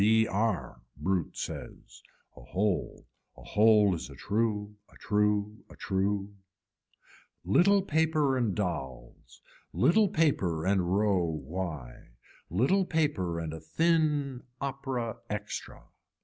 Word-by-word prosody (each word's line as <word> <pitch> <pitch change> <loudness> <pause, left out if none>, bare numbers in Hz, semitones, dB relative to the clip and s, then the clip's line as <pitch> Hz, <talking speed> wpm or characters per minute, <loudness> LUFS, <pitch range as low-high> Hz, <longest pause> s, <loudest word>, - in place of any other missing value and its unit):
B 110 +2 +4
r, 100 - -1 0.2
brute 95 -3 -1
says. - - -7 0.3
A - - -13
hole, 95 0 -2 0.3
a - - -13
hole 105 -2 +4
is 80 -7 -5
a 70 - -11
true, 105 - -1 0.2
a - - -17
true, 105 0 0
a - - -13
true. 100 +1 -1 1.1
Little 190 - +4
paper 155 -5 +2
and 120 -7 0
dolls, 65 - -5 0.3
little 190 - +4
paper 95 - +1
and 95 -2 +1
row 100 -4 +2
why, 80 -6 -5 0.4
little 135 - +2
paper 105 - 0
and 80 -1 -4
a 80 - -6
thin 150 - +1 0.2
opera 135 -4 -3
extra. 105 0 -5
105 Hz, 115 wpm, -29 LUFS, 90-135 Hz, 1.1 s, B